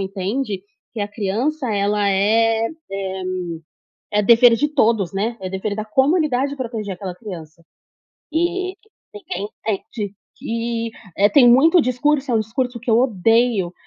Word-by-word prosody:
entende 195 +2 -3 0.3
que 225 - -5
a 205 - -2
criança 235 +7 -2
ela 205 0 +1
é 225 +3 +2 1.5
é 210 - +3
é - - +4
dever 235 +1 +6
de 295 +6 +1
todos, 225 - +1
né, 225 +4 -2
é 185 - -4
dever 195 +2 -3
da 215 0 -4
comunidade 275 +2 +1
proteger 225 -6 -4
aquela 185 -1 -6
criança. 165 -6 -10 0.7
E 370 +3 -1 0.4
ninguém 210 - -5 0.2
entende 205 0 -3 0.2
que, 230 0 -3 0.3
eh, 205 +1 +5
tem 265 -5 +6
muito 315 +9 +6
discurso, 270 +1 0
é - - +1
um 225 - +3
discurso 240 +3 -3
que 240 - -6
eu 225 - +5
odeio, 225 -4 +2
225 Hz, 145 wpm, -20 LUFS, 200-255 Hz, 1.5 s, dever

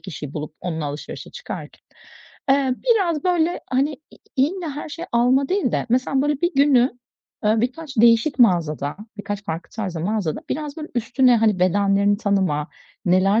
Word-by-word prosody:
kişiyi 150 -6 -8
bulup 155 0 -5
onunla 160 -3 -3
alışverişe 145 +1 -6
çıkarken, - - -8 0.7
eee, 270 -2 +3 0.2
biraz 350 -9 +2
böyle, 350 -1 +1
hani, 275 +4 +1 0.2
i - - -18 0.2
illa 320 +4 0
her - - -5
şeyi 335 +4 -7
alma 255 +3 +3
değil 380 -9 0
de - - -1
mesela 255 +2 +2
böyle 295 -1 0
bir 345 -2 0
günü, 265 -3 +3 0.5
eee, 215 +1 +3
birkaç 270 +3 -3
değişik 230 +5 +4
mağazada, 160 - +2 0.2
birkaç 205 0 -5
farklı 165 -1 -5
tarzda 190 -7 -4
mağazada; 195 -3 -1
biraz 300 +1 -3
böyle 310 0 -6
üstüne 245 +1 +3
hani 215 -4 +2
bedenlerini 200 +2 +3
tanıma, 190 -8 0 0.4
neler 190 +4 +3
235 Hz, 155 wpm, -22 LUFS, 190-285 Hz, 0.7 s, değişik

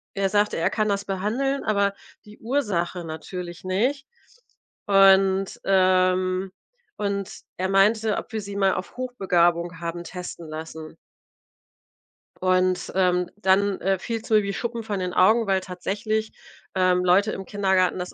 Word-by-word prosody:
er 195 -1 +1
sagte, 205 +1 +1
er 165 - +1
kann 215 -2 0
das 200 0 -1
behandeln, 225 +9 -1
aber 200 -2 +1 0.3
die 210 0 -15
Ursache 195 -9 -1
natürlich 175 +2 -7
nicht. 245 +10 -1 0.8
Und 195 -1 +4
ähm, 185 0 +2 0.5
und 200 -2 -2 0.3
er 185 +1 -1
meinte, 210 +2 +3
ob - - -6
wir 220 - -2
sie 200 0 -8
mal 195 -1 +2
auf 185 - -6
Hochbegabung 175 -8 0
haben 170 0 -5
testen 180 -2 -8
lassen. 160 0 -8 1.4
Und, 185 0 +1
ähm, 180 -1 +2
dann, 200 0 +2
äh, 195 0 +1
fiel's 225 +2 -5
mir 215 -1 +4
wie 200 0 -3
Schuppen 235 +1 -4
von 205 -3 -3
den 180 -1 -3
Augen, 220 +4 +4
weil 190 -1 +2
tatsächlich, 205 +4 -3 0.4
ähm, 185 -1 +3
Leute 190 +4 +3
im 195 - -6
Kindergarten 190 -3 +1
das 180 0 -5
195 Hz, 140 wpm, -24 LUFS, 180-210 Hz, 1.4 s, Und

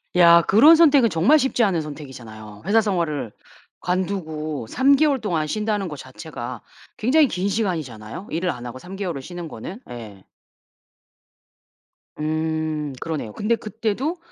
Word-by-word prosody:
야 170 -1 +7
그런 235 - +7
선택은 290 -7 +5
정말 185 - +4
쉽지 265 -4 +1
않은 185 -6 +2
선택이잖아요. 120 -8 -10
회사 220 +4 +4
생활을 170 - -1 0.5
관두고 160 - -2
3 270 - +4
개월 280 -3 +2
동안 170 -8 -1
쉰다는 210 +3 -1
거 150 - -6
자체가 130 -3 -8 0.4
굉장히 280 +7 +4
긴 185 -4 -2
시간이잖아요, 165 - -3
일을 175 +3 -1
안 125 -6 -5
하고 125 +1 -7
3 180 +6 -9
개월을 180 -8 -4
쉬는 175 +4 -7
거는. 165 - -8
예. 110 -5 -9 1.9
음 155 -1 -2
그러네요. 155 -9 -4
근데 215 - +1
그때도 225 - -3
170 Hz, 295 characters per minute, -22 LUFS, 150-215 Hz, 1.9 s, 야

